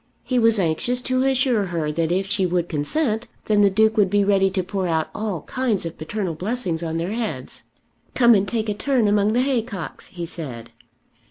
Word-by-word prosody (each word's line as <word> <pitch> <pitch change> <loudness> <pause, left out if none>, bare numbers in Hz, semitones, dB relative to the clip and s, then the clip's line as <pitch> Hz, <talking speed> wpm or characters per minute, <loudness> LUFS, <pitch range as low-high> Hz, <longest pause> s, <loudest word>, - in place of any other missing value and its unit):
He 255 -2 0
was 230 -1 +5
anxious 190 +8 +1
to 255 0 +1
assure 260 -5 +2
her 165 -3 -2
that 165 +1 -1
if 190 +2 +1
she 195 0 0
would 175 -1 0
consent, 220 - -1 0.2
then 210 -1 +3
the 200 - +6
Duke 220 +3 +2
would 200 -3 +4
be 205 +1 +3
ready 195 -1 +3
to 190 -1 -1
pour 190 0 -2
out 160 -2 -1
all 210 -7 -3
kinds 245 -8 -1
of 165 - -5
paternal 185 +2 -3
blessings 180 -1 -2
on 165 -1 -3
their 170 +4 -2
heads. 225 0 -5 0.5
"Come 240 -2 +6
and 200 -2 +2
take 225 -2 -2
a 210 - 0
turn 245 +1 +1
among 205 +1 +2
the 245 - +3
haycocks," 230 - -3
he 175 -2 -6
said. 125 -9 -8
200 Hz, 200 wpm, -22 LUFS, 170-230 Hz, 0.5 s, the